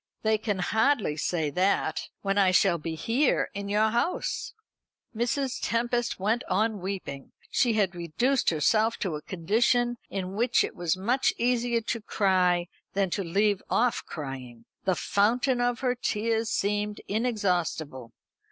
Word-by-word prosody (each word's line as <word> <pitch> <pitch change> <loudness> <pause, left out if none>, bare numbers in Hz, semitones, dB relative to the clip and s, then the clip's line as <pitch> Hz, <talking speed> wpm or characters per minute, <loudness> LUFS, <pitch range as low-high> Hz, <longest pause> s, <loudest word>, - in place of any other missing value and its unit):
"They 220 -1 +2
can 205 -2 -1
hardly 220 - +1
say 155 -1 -1
that, 185 +6 0
when 195 0 +1
I 195 -2 +5
shall 185 -1 +3
be 160 +1 -4
here 245 - +1
in 200 0 -5
your 215 +2 +2
house!" 240 +10 -1 0.6
Mrs. 250 +3 -1
Tempest 240 0 0
went 220 +6 0
on 210 +3 +1
weeping. 180 -8 -6 0.2
She 245 -4 +2
had 200 -4 +1
reduced 175 - +1
herself 215 +8 +2
to 180 -6 -2
a 150 - -6
condition 235 +8 +1
in 190 -1 -4
which 235 +4 +2
it - - -4
was 175 0 0
much 245 +8 +1
easier 240 -1 +1
to 230 +1 -3
cry 185 -4 +2 0.3
than 195 -2 0
to 200 - -1
leave 200 +3 +1
off 245 0 +1
crying. 130 -6 -7 0.2
The 185 -1 +2
fountain 245 +7 +1
of 245 -1 0
her 250 -2 +2
tears 225 -2 -1
seemed 210 0 -1
inexhaustible. 180 - -1
205 Hz, 145 wpm, -27 LUFS, 180-235 Hz, 0.6 s, I